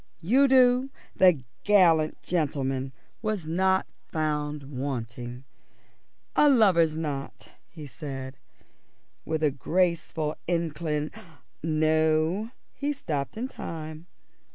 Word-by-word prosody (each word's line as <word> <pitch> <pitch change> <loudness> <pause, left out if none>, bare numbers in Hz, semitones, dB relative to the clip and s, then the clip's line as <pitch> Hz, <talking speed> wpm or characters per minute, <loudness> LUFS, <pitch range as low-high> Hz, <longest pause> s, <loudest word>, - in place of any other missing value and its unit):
Udo, 255 +2 +5 0.3
the 180 -8 +5 0.2
gallant 170 -7 +4
gentleman, 135 -5 -1 0.3
was 215 -6 -2
not 190 +4 +2 0.2
found 150 -2 -2
wanting. 125 -2 -5 0.9
"A 295 - +6
lover's 180 - +4
knot," 145 -4 -5 0.2
he 155 -3 -10
said, 135 -2 -7 0.9
with 160 0 -2
a 150 - +4
graceful 165 +1 0
incli 160 -3 -1 0.5
no, 155 +5 +2 0.2
he 285 +1 -2
stopped 150 - -4
in 245 +3 -2
time. 160 -7 -7
155 Hz, 90 wpm, -27 LUFS, 145-185 Hz, 0.9 s, A